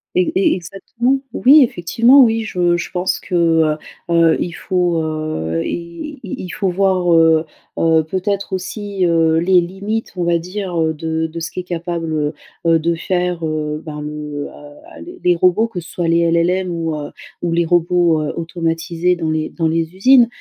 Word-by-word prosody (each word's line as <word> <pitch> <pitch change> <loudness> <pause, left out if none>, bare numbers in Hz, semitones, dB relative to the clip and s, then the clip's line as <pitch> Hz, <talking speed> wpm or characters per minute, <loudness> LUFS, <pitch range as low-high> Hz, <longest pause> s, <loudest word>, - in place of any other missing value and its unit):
E 360 -3 +2
e 370 -4 +3
exactement! 230 +8 -2
Oui, 280 +5 +6
effectivement, 235 +6 +4
oui, 225 -2 +3
je 175 -5 +1
je 175 - -4
pense 185 0 -1
que - - -10 0.3
heu 155 -1 0 0.3
heu, 165 -1 +4
il 175 - -2
faut 175 -1 0
heu, 155 - -3
i 170 - -6
i 195 - -6
il 180 - -7
faut 195 - -2
voir 185 -1 +2
heu 165 -1 +4 0.3
heu, 160 -1 +3
peut-être 190 +5 -2
aussi, 195 +1 -3
heu, 165 -1 +3
les 180 +2 +4
limites 200 +5 -4
on 175 - -1
va 170 0 +2
dire, 180 +2 -5
heu, 160 0 +1
de 160 +1 -2
de 165 +1 -7
ce 165 0 -4
qu'est 180 - -5
capable, 165 -3 -3 0.3
heu, 165 -1 +4
de 170 +2 0
faire, 180 0 -2
heu, 155 -1 -3
bah 150 -1 -6
le 150 -1 -5
heu, 145 0 -14
les 355 +2 -10
les 180 0 +4
robots. 185 +6 +3
Que 200 -6 -5
ce 170 0 -11
soit 175 -2 -2
les 170 0 +3
LLM 180 +3 +1
ou, 165 -2 -2
heu, 145 - -7 0.3
les 170 0 +1
robots, 175 -1 +2
heu, 150 - -3
automatisés 165 +1 -1
dans 165 -2 -3
les 155 0 -1
dans 165 -2 -1
les 165 +1 -2
usines. 245 +5 +6
170 Hz, 180 wpm, -18 LUFS, 160-185 Hz, 0.3 s, Oui